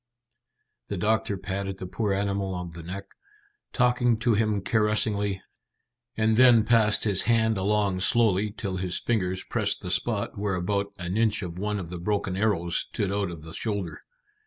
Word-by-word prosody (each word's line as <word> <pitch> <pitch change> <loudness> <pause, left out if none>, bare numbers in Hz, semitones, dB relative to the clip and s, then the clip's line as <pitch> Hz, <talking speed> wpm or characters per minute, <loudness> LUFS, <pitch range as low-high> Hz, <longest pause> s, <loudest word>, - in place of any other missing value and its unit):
The 100 - -4
doctor 105 +1 0
patted 95 0 -4
the 95 - -6
poor 105 +3 -2
animal 100 -1 -1
on 90 -1 -5
the 85 +1 -9
neck, 95 +4 -7 0.7
talking 125 -2 +2
to 115 +1 +1
him 105 -1 +1
caressingly, 105 -2 +1 0.7
and 110 0 +2
then 120 -3 +7
passed 110 -2 +4
his 100 -3 +3
hand 110 -1 +3
along 100 -1 +1
slowly 105 0 +3
till 100 -2 -5
his 90 -1 -1
fingers 95 -5 -1
pressed - - -1
the - - -4
spot - - -1
where 100 -2 -1
about 100 +3 -1
an 90 +1 -3
inch 110 -2 +2
of 90 0 -6
one 105 +1 -1
of 90 -4 -6
the 90 - -5
broken 100 0 -1
arrows 95 -4 0
stood 100 -3 -2
out 100 -2 -1
of 85 -3 -9
the 80 +1 -9
shoulder. 100 -5 -3
100 Hz, 170 wpm, -26 LUFS, 95-110 Hz, 0.7 s, then